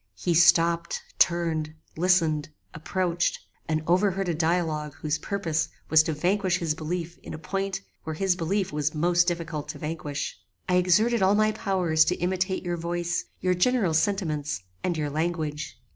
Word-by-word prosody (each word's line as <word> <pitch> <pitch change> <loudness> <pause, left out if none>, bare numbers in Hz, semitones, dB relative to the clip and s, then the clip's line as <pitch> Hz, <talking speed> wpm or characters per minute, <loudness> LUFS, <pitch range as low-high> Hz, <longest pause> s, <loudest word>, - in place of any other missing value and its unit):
"He 175 - -1
stopped, 170 0 +4 0.2
turned, 160 -3 +1 0.2
listened, 165 -4 +2 0.2
approached, 175 +2 -1 0.3
and 155 0 0
overheard 185 +1 +2
a - - +1
dialogue 160 -3 0
whose 155 0 -2
purpose 165 -6 -1 0.2
was 160 0 +8
to 160 0 -2
vanquish 185 +4 +1
his 165 -4 -1
belief 165 +2 -4
in - - -8
a - - -7
point 195 +3 -3 0.2
where 160 - -4
his 190 +2 +1
belief 185 +1 -1
was 150 +1 -1
most 175 +2 +3
difficult 165 -4 -3
to - - -5
vanquish. 150 -2 -4 0.3
I 180 -1 +3
exerted 210 +6 +3
all 190 +2 +4
my 215 +1 +3
powers 185 -7 +2
to 180 - +1
imitate 185 +1 -1
your 175 -1 -2
voice, 175 +1 -2 0.2
your 185 0 +2
general 195 -1 +2
sentiments, 155 - 0 0.2
and 175 -3 0
your 150 -2 -2
language. 155 -1 -3
170 Hz, 160 wpm, -26 LUFS, 155-185 Hz, 0.3 s, was